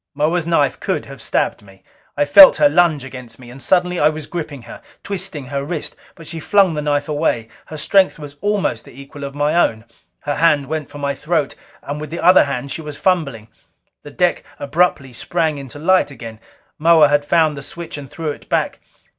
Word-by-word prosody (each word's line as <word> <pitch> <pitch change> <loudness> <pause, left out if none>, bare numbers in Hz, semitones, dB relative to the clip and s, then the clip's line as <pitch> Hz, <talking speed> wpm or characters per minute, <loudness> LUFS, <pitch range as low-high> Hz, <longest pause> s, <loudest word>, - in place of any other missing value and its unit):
Moa's 160 +3 0
knife 145 -5 +1
could - - -2
have - - -11
stabbed - - -1
me. 95 -2 -19 0.3
I 145 - +2
felt 275 - +9
her 295 - +5
lunge 170 - +2
against 125 -3 -9
me. 120 -2 -13
And 135 +2 -11
suddenly 180 +1 +1
I 150 - +4
was 155 -1 -6
gripping 150 -7 -6
her, - - -11 0.2
twisting 185 -8 -4
her 140 +1 -4
wrist. 155 +1 -4 0.2
But 165 - -13
she 165 - -5
flung 195 +1 +3
the 150 - -3
knife 145 -1 -1
away. 145 -7 -1 0.2
Her 155 - -8
strength 190 +5 +3
was 145 -2 -10
almost 205 - -1
the 130 - -15
equal 140 +1 -10
of 140 0 -6
my 145 +1 0
own. 110 -10 +1 0.4
Her 145 - -3
hand 150 -4 +3
went 155 +1 -4
for - - -10
my 140 -1 -2
throat, 150 0 -1 0.3
and 145 +1 -5
with 150 - -6
the 170 - -5
other 180 -2 +6
hand 140 -1 -4
she 160 - -4
was 150 -2 -8
fumbling. 140 - -1 0.5
The - - -11
deck - - 0
abruptly 140 -3 0
sprang 155 +5 -1
into 135 0 -9
light 185 +2 +2
again. 115 -5 -10 0.4
Moa 160 -1 +6
had 145 0 +2
found 155 0 +2
the 140 - -7
switch 170 +4 -8
and 140 -2 -9
threw 150 +1 -4
it - - -12
back. - - -1
150 Hz, 205 wpm, -19 LUFS, 140-165 Hz, 0.5 s, felt